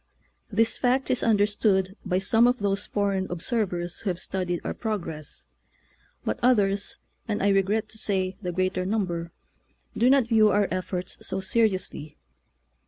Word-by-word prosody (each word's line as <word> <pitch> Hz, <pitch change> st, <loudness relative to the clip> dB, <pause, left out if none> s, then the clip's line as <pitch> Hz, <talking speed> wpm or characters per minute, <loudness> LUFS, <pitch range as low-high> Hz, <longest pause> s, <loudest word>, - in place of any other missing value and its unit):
This 225 Hz, +2 st, +1 dB
fact 255 Hz, +1 st, +2 dB
is 255 Hz, -, +1 dB
understood 205 Hz, -3 st, +2 dB
by 185 Hz, -3 st, 0 dB
some 225 Hz, +5 st, +4 dB
of 250 Hz, +1 st, +2 dB
those 200 Hz, -1 st, -1 dB
foreign 200 Hz, -2 st, 0 dB
observers 175 Hz, -2 st, -2 dB
who 205 Hz, -, -2 dB
have 180 Hz, -1 st, -2 dB
studied 180 Hz, -2 st, -2 dB
our -, -, -3 dB
progress; 165 Hz, -, -4 dB, 0.8 s
but 110 Hz, -, -1 dB
others, 205 Hz, -5 st, +2 dB, 0.3 s
and 210 Hz, -3 st, -1 dB
I 200 Hz, -, +4 dB
regret 200 Hz, +3 st, +2 dB
to 220 Hz, -, -8 dB
say 190 Hz, -3 st, -1 dB
the 180 Hz, -3 st, -3 dB
greater 185 Hz, +1 st, 0 dB
number, 180 Hz, -4 st, -2 dB, 0.6 s
do 245 Hz, -, +4 dB
not 270 Hz, -2 st, +5 dB
view 220 Hz, -2 st, +5 dB
our 205 Hz, 0 st, +3 dB
efforts 185 Hz, 0 st, -3 dB
so 190 Hz, -, -2 dB
seri 215 Hz, +1 st, +2 dB
ously. 155 Hz, -4 st, -7 dB
195 Hz, 155 wpm, -26 LUFS, 185-220 Hz, 0.8 s, not